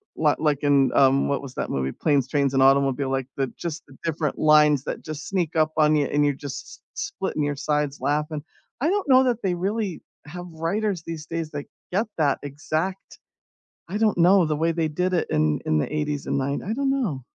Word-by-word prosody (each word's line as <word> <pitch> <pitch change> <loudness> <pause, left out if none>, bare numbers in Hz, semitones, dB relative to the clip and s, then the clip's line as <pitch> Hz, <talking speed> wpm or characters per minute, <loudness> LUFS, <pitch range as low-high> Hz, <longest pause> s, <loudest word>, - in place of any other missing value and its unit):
li 150 -2 +3
like 150 -2 0
in 140 -2 +4
um, 135 0 +4
what 140 - 0
was 135 -2 -9
that - - -3
movie? 65 0 -1
Planes, 140 - +1
Trains 140 -1 +1
and 135 0 +4
Automobile 135 0 +3
like, 135 -1 -1
the 135 -1 0
just 170 -2 -5
the 135 - -16
different 160 -3 -2
lines 150 -3 +5
that - - -5
just 155 -1 -6
sneak 180 -4 -1
up 155 -1 +3
on 155 0 +4
you, 145 -1 +2
and 145 0 +1
you're 145 - +2
just 140 0 -7
s - - -13 0.2
s - - -4
splitting 150 - -3
your 145 0 -1
sides 150 0 -1
laughing. 150 0 -1 0.4
I 305 - +2
don't 400 -1 0
know 260 0 +7
that 245 -3 0
they 190 -2 +1
really 195 +1 -2 0.2
have 175 +4 -8
writers 185 +3 -1
these 160 -2 -6
days 165 -1 -4
that 145 -1 -5 0.3
get 205 +5 +2
that 145 -3 +3
exact 155 +6 -4 0.7
I 195 - -2
don't 215 -4 +2
know, 180 +1 +6
the 155 - 0
way 165 +2 +1
they 165 -1 0
did 180 +5 -1
it 175 - 0
in 75 0 +1
in 80 - +2
the 75 - -1
'80s 150 -1 -2
and - - 0
nine 140 +1 -2
I 210 - -3
don't 275 +2 0
know. 205 - -1
150 Hz, 220 wpm, -24 LUFS, 140-175 Hz, 0.7 s, know